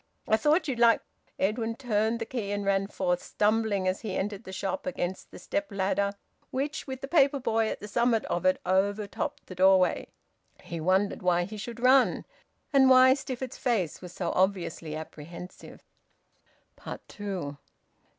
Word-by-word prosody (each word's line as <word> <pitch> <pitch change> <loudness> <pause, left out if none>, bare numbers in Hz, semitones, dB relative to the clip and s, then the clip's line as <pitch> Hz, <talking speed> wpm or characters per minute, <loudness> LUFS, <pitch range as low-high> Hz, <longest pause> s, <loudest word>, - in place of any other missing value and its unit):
I 220 - +4
thought 305 +8 +2
you'd 255 -4 -2
like 235 -1 +5 0.2
" - - -39
Edwin 225 +2 -3
turned 225 -3 0
the 225 - -4
key, 220 -4 -4
and 205 0 -2
ran 195 0 +1
forth, 180 -3 -1
stumbling, 210 -2 +1
as 185 +1 -1
he 210 -4 -4
entered 205 0 -3
the 190 - -8
shop, 195 +9 -3
against 185 -8 -3
the - - -11
step 295 +8 -3
ladder 200 +1 0 0.4
which, 290 +4 -3
with 260 -1 -6
the 275 - -5
paper 280 -2 +4
boy 225 -3 +1
at - - -5
the 210 - -6
summit 235 +1 +1
of 175 - -2
it, 185 0 +3
overtopped 200 +3 -1
the - - -9
doorway. 185 0 +4 0.6
He 170 - -6
wondered 190 +4 +1
why 175 -1 +2
he 200 +5 -7
should 230 +3 -7
run, 255 +1 +4 0.5
and 265 -1 +6
why 260 0 +8
Stifford's 260 -2 -5
face 205 - 0
was 180 -2 -9
so 175 -1 -3
obviously 180 -4 0
apprehensive. 160 +3 -10 1.2
TWO. 185 -9 -5
205 Hz, 165 wpm, -28 LUFS, 185-245 Hz, 1.2 s, why